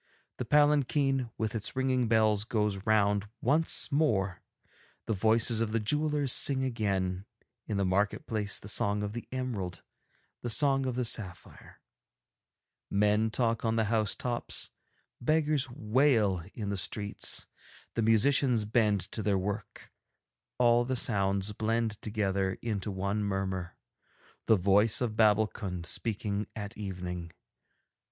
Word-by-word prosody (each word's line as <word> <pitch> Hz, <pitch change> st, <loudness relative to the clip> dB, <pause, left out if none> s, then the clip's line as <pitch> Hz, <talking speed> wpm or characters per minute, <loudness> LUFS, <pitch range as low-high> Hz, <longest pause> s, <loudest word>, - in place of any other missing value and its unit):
The 125 Hz, -, -3 dB
palanquin, 140 Hz, -2 st, +2 dB
with 110 Hz, -1 st, -2 dB
its 110 Hz, +2 st, -2 dB
ringing 130 Hz, -2 st, +1 dB
bells, 110 Hz, -2 st, +3 dB
goes 105 Hz, -3 st, -1 dB
round 105 Hz, -1 st, +2 dB
once 155 Hz, +7 st, +2 dB
more; 105 Hz, -, +1 dB, 0.6 s
the 110 Hz, -, -1 dB
voices 110 Hz, +2 st, +2 dB
of 110 Hz, -1 st, -1 dB
the 115 Hz, -, +2 dB
jewellers 150 Hz, +3 st, 0 dB
sing 135 Hz, -2 st, +2 dB
again, 100 Hz, -6 st, -2 dB, 0.4 s
in 105 Hz, -, -2 dB
the 100 Hz, -, +1 dB
market 100 Hz, +3 st, 0 dB
place, 105 Hz, -2 st, -1 dB
the -, -, -7 dB
song 105 Hz, 0 st, +2 dB
of 105 Hz, 0 st, -4 dB
the 120 Hz, -, -7 dB
emerald, 110 Hz, -10 st, -4 dB, 0.6 s
the 120 Hz, -, -3 dB
song 135 Hz, +2 st, +3 dB
of 125 Hz, -, -2 dB
the 125 Hz, -1 st, -1 dB
sapphire; 95 Hz, -6 st, -5 dB, 1.1 s
men 105 Hz, +2 st, +2 dB
talk 115 Hz, 0 st, 0 dB
on 115 Hz, -1 st, +1 dB
the 110 Hz, -1 st, 0 dB
housetops, 115 Hz, +2 st, -1 dB, 0.5 s
beggars 150 Hz, 0 st, +1 dB
wail 110 Hz, -5 st, +2 dB
in 105 Hz, -3 st, -4 dB
the 100 Hz, -, -2 dB
streets, 100 Hz, +2 st, -2 dB, 0.5 s
the 115 Hz, -, -1 dB
musicians 115 Hz, +1 st, +3 dB
bend 105 Hz, -2 st, +2 dB
to 110 Hz, -, -3 dB
their 100 Hz, -2 st, +1 dB
work, 100 Hz, +2 st, -5 dB, 0.7 s
all 120 Hz, -1 st, +4 dB
the 130 Hz, +2 st, -2 dB
sounds 100 Hz, -3 st, 0 dB
blend 110 Hz, 0 st, -1 dB
together 100 Hz, -3 st, -1 dB
into 105 Hz, -3 st, -2 dB
one 100 Hz, +2 st, -2 dB
murmur, 95 Hz, -3 st, -3 dB, 0.7 s
the 110 Hz, -, +6 dB
voice 100 Hz, +3 st, +4 dB
of 115 Hz, -4 st, -2 dB
Babbulkund 105 Hz, -4 st, +1 dB
speaking 105 Hz, +2 st, -3 dB
at 105 Hz, 0 st, -6 dB
evening. 90 Hz, -4 st, -5 dB
110 Hz, 130 wpm, -30 LUFS, 100-120 Hz, 1.1 s, the